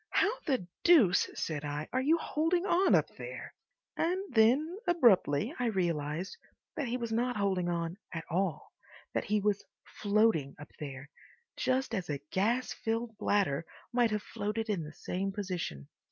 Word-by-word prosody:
"How 405 - +3 0.2
the 255 - 0 0.2
deuce," 265 - +6
said 150 -3 -3
I, 145 +1 -3
"are 260 - +2
you 310 +5 +4
holding 330 +3 0
on 370 0 +4
up - - +3
there?" - - -7 0.4
And 355 +3 +1
then 270 - +4
abruptly 235 - +4
I 245 - +1
realised 170 -4 -1 0.4
that 290 -4 -2
he 240 +2 -1
was 235 -2 -4
not 240 +1 0
holding 190 -3 +1
on 170 +1 -2
at 165 -2 -4
all, 180 -2 -2 0.4
that - - -1
he 210 +1 +2
was 205 0 0 0.2
floating 205 -9 +1
up 145 - -11
there—just 155 - -4
as 185 -7 -2
a 145 - -1
gas 235 +7 +1
filled 225 0 -2
bladder 190 -9 +1 0.3
might 240 -1 +4
have 210 -1 -2
floated 220 +1 -3
in 190 -5 -1
the 155 0 -8
same 195 +4 -3
position. 180 - -4
210 Hz, 155 wpm, -31 LUFS, 170-250 Hz, 0.4 s, deuce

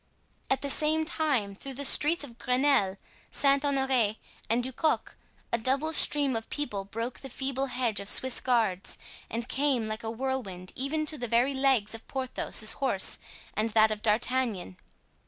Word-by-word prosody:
At 270 - +1
the 280 - 0
same 315 +2 +1
time 290 -11 0
through 265 +7 -7
the 280 +2 -3
streets 305 +4 +5
of 240 -4 -11
Grenelle, 250 -7 +2 0.3
Saint 275 0 +2
Honore, 265 -6 +1 0.3
and 235 +2 +1
Du 260 +1 -4
Coq, 315 +4 -1 0.4
a 235 - +2
double 275 +7 0
stream 285 -4 +4
of 225 0 -5
people 210 -10 -3
broke 230 +5 -5
the 270 - -9
feeble 270 +1 -2
hedge 245 -4 -1
of 200 0 -5
Swiss 260 -1 +2
guards 220 -7 0 0.3
and 230 +1 -4
came 270 -5 0
like 215 +1 -5
a 225 - -3
whirlwind 225 -7 -4
even 305 +4 -2
to 305 -1 -3
the 245 - -3
very 240 +5 +2
legs 265 -6 +1
of 225 - -10
Porthos's 260 -4 +2
horse 250 -9 +1 0.3
and 215 +2 -1
that 220 0 +5
of 210 -1 -4
D'Artagnan. 220 - 0
255 Hz, 170 wpm, -28 LUFS, 220-275 Hz, 0.4 s, streets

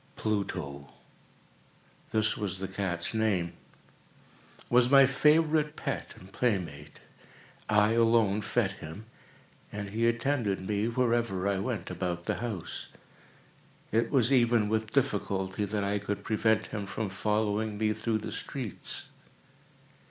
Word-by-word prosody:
Pluto—this 90 - -5
was 95 -3 -2
the 95 0 -4
cat's 95 -2 -3
name—was 110 +4 -2
my 135 0 +8
favorite 150 +2 +3
pet - - -4
and 95 +1 -14
playmate. 90 - -2 0.7
I 105 0 +4
alone 115 -3 +3
fed 105 -1 +1
him, 95 +3 -9 0.7
and 100 -1 -5
he 115 +2 +1
attended 115 -6 0
me 105 +1 0
wherever 115 -5 +1
I 100 -1 +1
went 100 -3 -3
about 90 -1 -3
the - - -1
house. 110 -7 -4 1.0
It 115 +2 +2
was 130 -3 +3
even 120 -4 +4
with 110 0 0
difficulty 100 -5 0
that 105 0 -2
I 100 +1 0
could 105 0 -4
prevent 110 0 +2
him 100 -2 -4
from 100 +1 -3
following 105 +2 0
me 110 0 +1
through 110 0 -1
the 110 - -6
streets. 125 - -3
105 Hz, 120 wpm, -29 LUFS, 95-115 Hz, 1.0 s, my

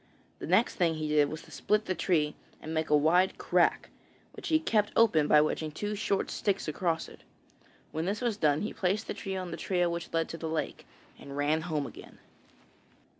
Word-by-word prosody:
The - - -6
next - - +3
thing 170 -3 +2
he 155 -1 -3
did 150 -1 +3
was 155 - -7
to - - -17
split 210 +1 0
the 185 - 0
tree 155 -5 +1 0.3
and 160 - -6
make 160 0 -1
a 150 - +6
wide 175 +5 +3
crack, - - +1 0.4
which - - -8
he 315 - +4
kept 215 -9 +1
open 160 -10 +4
by 150 - +6
wedging 155 0 -1
two 205 +7 -3
short 200 -1 -1
sticks 200 -4 -1
across 165 +1 -1
it. - - -14 0.7
When 160 +2 -2
this 200 +3 -1
was 240 -4 0
done 150 -6 +2
he 210 - -3
placed 195 +4 0
the - - -4
tree 195 -2 -5
on 185 -2 -4
the - - -5
trail 180 -2 0
which 170 0 -5
led 165 -1 0
to 165 - -6
the 160 - -4
lake, 155 -3 -3 0.3
and 140 0 -9
ran 150 +2 +1
home 155 -4 -2
again. - - -11
165 Hz, 210 wpm, -30 LUFS, 155-195 Hz, 0.7 s, a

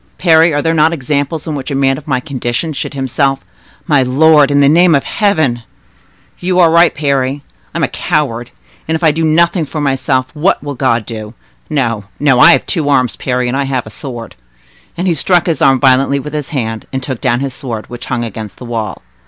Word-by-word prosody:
Parry, 165 -1 +4
are 145 -1 -1
there 165 - +1
not 160 +1 +3
examples 145 +1 -2
in 155 - -3
which 140 -1 -5
a 140 - -2
man 135 0 +2
of 145 +2 -11
my 130 -3 0
condition 135 +2 -3
should 140 - -5
himself—" 135 +1 -1 0.4
"My 145 -5 +3
lord, 145 +3 +4
in 145 0 +2
the 140 - +5
name 170 +2 +5
of 140 - +1
Heaven—" 160 - 0 0.8
"You 180 0 -1
are 170 -3 +5
right, 170 +1 +4
Parry; 140 -1 -1 0.3
I - - -5
am 170 - -1
a - - +3
coward, 130 -9 -2 0.4
and 160 - 0
if 160 - -4
I 160 - +5
do 160 +2 -2
nothing 170 +2 +2
for 155 +1 -5
myself, 135 -2 0
what 160 +3 +1
will 145 -1 -4
God 120 -4 0
do? 110 0 -8 0.3
No, 115 -8 -1
no; 135 -4 +3
I - - +8
have 135 - 0
two 155 -5 -1
arms, 130 -4 +2
Parry, 125 -1 -2
and 120 - -2
I 140 0 0
have 130 -3 -2
a 110 - -10
sword." 120 -3 -8 0.6
And 180 - -2
he 175 - +2
struck 175 +3 +2
his 165 -3 -1
arm 135 -1 +4
violently 135 +1 +3
with 150 +2 -7
his 150 0 -4
hand, 115 -7 -4
and 130 -1 -4
took 130 -3 -4
down 120 -2 +1
his 135 -2 -3
sword, 120 -5 -6
which 120 0 -9
hung 120 -2 -2
against 110 -3 -7
the 125 - -10
wall. 110 -6 -4
140 Hz, 220 wpm, -14 LUFS, 125-155 Hz, 0.8 s, I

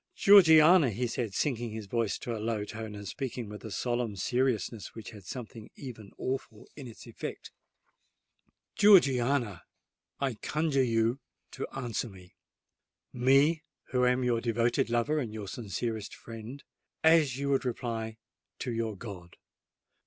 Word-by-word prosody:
Georgiana," 165 -5 +7
he 115 +4 -2
said, 115 -3 -3
sinking 120 -5 -1
his 110 -1 -6
voice 115 +1 -1
to 120 - -4
a 110 - -5
low 110 -2 -1
tone, 110 0 -7
and 100 -1 -8
speaking 125 0 -4
with 105 0 -9
a 110 - -6
solemn 120 +1 -2
seriousness 120 -2 -1
which 110 -3 -8
had 105 -3 -12
something 115 +2 -8
even 110 -7 -9
awful 130 -5 -4
in 140 -4 -8
its 115 - -12
effect,—"Georgiana, 130 - 0 0.6
I 135 -2 0
conjure 150 -3 +1
you 115 +1 +1 0.3
to - - -5
answer 120 -2 -3
me,—me, 130 - -1 0.3
who 125 -1 +2
am 125 +1 +3
your 120 -2 +1
devoted 115 0 +1
lover 120 +6 +1
and 120 -7 -3
your 105 -2 -6
sincerest 110 +1 -4
friend,—as 135 +5 -1
you 140 0 -2
would 135 - +2
reply 115 -3 -3 0.4
to 125 - -4
your 115 -3 -2
God! 90 -5 -9
120 Hz, 135 wpm, -30 LUFS, 110-135 Hz, 0.6 s, Georgiana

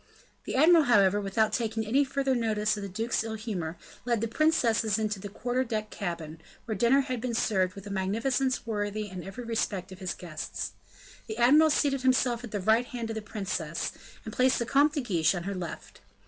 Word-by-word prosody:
The - - -3
admiral, 320 +3 +6
however, 205 -4 +4
without 210 +2 +1
taking 225 -2 -1
any 265 +7 +3
further 275 0 0
notice 215 -3 +1
of 205 - -6
the 200 - -5
duke's 225 +5 -1
ill 220 0 -4
humor, 185 -7 -4 0.3
led 235 -2 +1
the 230 - -1
princesses 230 -6 +2
into 215 -2 -1
the 205 +1 -7
quarter 245 +5 -1
deck 215 -3 -3
cabin, 165 -5 -5 0.2
where 225 - -2
dinner 235 +7 +4
had 255 -4 -4
been 245 -1 -2
served 185 -5 +1
with 200 0 -10
a 205 - -7
magnificence 230 +8 0
worthy 210 -1 -2
in 185 -2 -7
every 195 +6 -7
respect 220 -5 -2
of 185 - -10
his 185 -2 -3
guests. 160 -4 -5 0.6
The 220 -1 -5
admiral 295 +7 +6
seated 280 -3 +1
himself 255 -2 +2
at 240 - -6
the 205 - -3
right 220 +5 +3
hand 235 -3 -4
of - - -4
the 220 - -3
princess, 185 -6 -3 0.3
and 220 - -6
placed 255 +1 +3
the 235 - -1
Comte 285 +5 +3
de 295 - -1
Guiche 180 -8 +1
on 175 - -4
her 200 +2 -3
left. 180 -4 -7
220 Hz, 205 wpm, -28 LUFS, 195-245 Hz, 0.6 s, admiral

